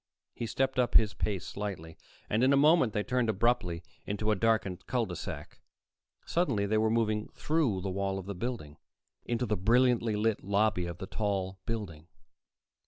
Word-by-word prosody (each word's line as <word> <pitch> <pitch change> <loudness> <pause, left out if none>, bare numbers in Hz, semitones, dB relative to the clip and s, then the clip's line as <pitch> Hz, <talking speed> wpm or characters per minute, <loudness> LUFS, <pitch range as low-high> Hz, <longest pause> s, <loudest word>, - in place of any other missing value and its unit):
He 115 - -4
stepped 130 +2 0
up 125 - +1
his 110 -1 +6
pace 100 -4 -2
slightly, 95 -6 -5 0.3
and 110 +3 +1
in 130 - +5
a 140 - +5
moment 150 -4 +5
they 105 -1 -1
turned 125 -1 0
abruptly 100 -6 +1 0.2
into 105 +1 -1
a - - +3
darkened 105 -4 0
cul 125 -2 +1
de 90 -4 -6
sac. - - -7 0.7
Suddenly, 130 - +1
they 110 +2 +1
were 110 0 +2
moving 110 -2 +1
through 145 - 0
the 95 0 -3
wall 95 0 -1
of 95 - -6
the 100 - -4
building 95 -8 -5 0.5
into 120 +1 -1
the 105 -2 0
brilliantly 120 +2 +3
lit 110 0 0
lobby 100 -2 +1
of 85 0 -6
the 95 - -6
tall 95 -2 -2
building. 95 -9 -5
105 Hz, 175 wpm, -30 LUFS, 95-120 Hz, 0.7 s, his